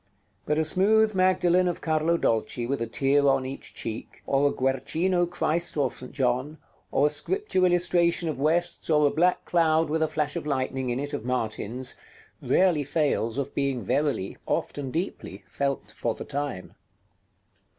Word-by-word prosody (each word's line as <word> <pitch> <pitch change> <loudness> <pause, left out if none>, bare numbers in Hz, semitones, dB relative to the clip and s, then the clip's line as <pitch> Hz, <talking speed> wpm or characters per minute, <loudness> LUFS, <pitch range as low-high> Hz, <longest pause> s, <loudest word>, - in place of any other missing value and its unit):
But 150 - +1
a 160 - +2
smooth 215 +6 +4
Magdalen 185 -1 +3
of 175 - -2
Carlo 160 +1 +1
Dolci 115 -2 0
with 135 +1 -2
a 115 - -1
tear 140 +4 +2
on 135 -1 +2
each 135 +1 -7
cheek, 110 +1 -6
or 140 +1 +2
a - - -2
Guercino 160 +8 0
Christ 170 -1 -1
or 135 -4 +1
St. 125 - -7
John, 130 +3 -1 0.3
or 140 - +3
a - - +4
Scripture 380 - -1
illustration 175 -1 +2
of 150 -4 -3
West's, 170 +5 0
or 150 -1 +4
a 145 - +3
black 175 +4 +1
cloud 160 -2 +2
with 160 +1 0
a 160 - +3
flash 150 -1 -2
of - - -4
lightning 130 -2 -1
in 120 +1 -1
it 145 +1 -4
of 145 - -3
Martin's, 125 0 -2 0.5
rarely 180 -6 +3
fails 140 -5 0
of 140 - -3
being 135 -4 -1
verily, 130 -3 -1
often 140 -2 -2
deeply, 130 - -5
felt 140 -7 -3
for 115 +1 -2
the - - -7
time. 140 -10 -4
145 Hz, 170 wpm, -26 LUFS, 130-170 Hz, 0.5 s, smooth